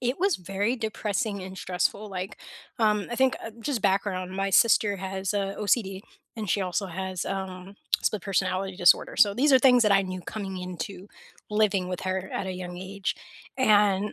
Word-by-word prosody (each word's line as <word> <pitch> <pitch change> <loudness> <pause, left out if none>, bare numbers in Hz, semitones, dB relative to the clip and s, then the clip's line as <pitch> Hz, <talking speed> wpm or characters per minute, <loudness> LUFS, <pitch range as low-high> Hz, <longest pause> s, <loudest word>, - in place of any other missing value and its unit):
it 245 +2 -1
was 380 -3 +2
very 195 +7 -1
depressing 215 -2 -2
and 190 0 -8
stressful, 185 +4 -1
like, 190 +1 -5 0.4
um, 210 -2 +2
I 240 - -3
think, 260 0 +3
uh, 225 - -5
just 245 -3 -2
background, 190 -2 0
my 195 +1 -1
sister 205 0 +4
has 190 0 -4
OCD 200 0 0 0.4
and 215 -3 -4
she 200 - +2
also 185 +2 -1
has, 185 0 -4
um, 190 0 -5 0.3
split 210 -4 0
personality 190 0 -1
disorder. 180 -2 +4
So 200 -1 +5
these 280 +3 +3
are 260 - +8
things 250 -2 +6
that 210 -2 +4
I 195 0 +5
knew 185 -1 -5
coming 190 -1 -5
into 180 +2 -6 0.4
living 205 -3 +2
with 180 - -4
her 190 0 -3
at 195 - -2
a 185 - -3
young 180 -1 -6
age, 190 +1 -3 0.4
and 210 -4 +3
195 Hz, 180 wpm, -27 LUFS, 185-215 Hz, 0.4 s, are